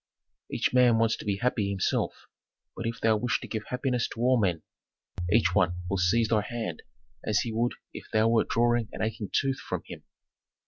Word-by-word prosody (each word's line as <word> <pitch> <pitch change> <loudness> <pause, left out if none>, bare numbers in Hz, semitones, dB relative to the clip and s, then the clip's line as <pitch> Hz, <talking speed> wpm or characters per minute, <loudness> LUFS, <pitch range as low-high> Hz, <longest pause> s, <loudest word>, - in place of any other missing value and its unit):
"Each - - 0
man 125 -2 +5
wants 115 0 +2
to - - -9
be 100 -1 +1
happy 110 -3 0
himself; 95 -2 -1 0.5
but 115 - -3
if 115 0 -4
thou 110 -1 +3
wish 120 +2 0
to - - -8
give 110 -1 -4
happiness 125 -2 -1
to - - -9
all 125 0 +4
men, 90 -5 0 0.7
each 105 -5 +3
one 90 -2 +2 0.2
will 100 - +1
seize 105 +5 +3
thy 110 -2 +3
hand 110 -7 -5 0.4
as 105 -1 +1
he 115 - -3
would 120 +2 0 0.2
if - - -9
thou 110 +1 +3
wert 115 0 +2
drawing 120 -1 +2
an - - -3
aching 110 -2 -3
tooth 135 -1 +1
from - - -4
him. - - -9
115 Hz, 195 wpm, -28 LUFS, 105-120 Hz, 0.7 s, man